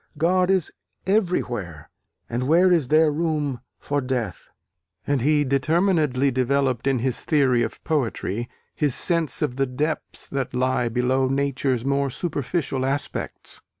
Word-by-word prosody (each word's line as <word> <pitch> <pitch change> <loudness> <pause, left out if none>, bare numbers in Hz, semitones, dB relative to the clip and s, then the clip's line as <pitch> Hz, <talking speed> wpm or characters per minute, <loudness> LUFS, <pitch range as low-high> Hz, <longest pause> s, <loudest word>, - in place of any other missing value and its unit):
God 180 +4 +2
is 190 -4 +1 0.3
everywhere, 120 - -1 0.4
and 120 +2 -2
where 175 +4 +5
is 165 -7 +3
there 155 +2 +4
room 150 -5 -1 0.2
for 145 0 -2
death? 125 - -3 0.6
And 140 -3 +1
he 150 +3 +3
determinedly 145 -1 +2
developed 130 0 0
in 135 -1 +3
his 125 +1 -2
theory 135 -6 +3
of 120 - -4
poetry, 120 - -1 0.2
his 145 -5 0
sense 165 -5 +1
of 125 - -2
the 135 0 +1
depths 150 +5 -3
that 135 -3 -3
lie 125 -1 +1
below 130 +3 +1
nature's 135 -2 0
more 140 0 +1
superficial 140 -1 -2
aspects. 135 +2 -3
140 Hz, 135 wpm, -23 LUFS, 125-155 Hz, 0.6 s, where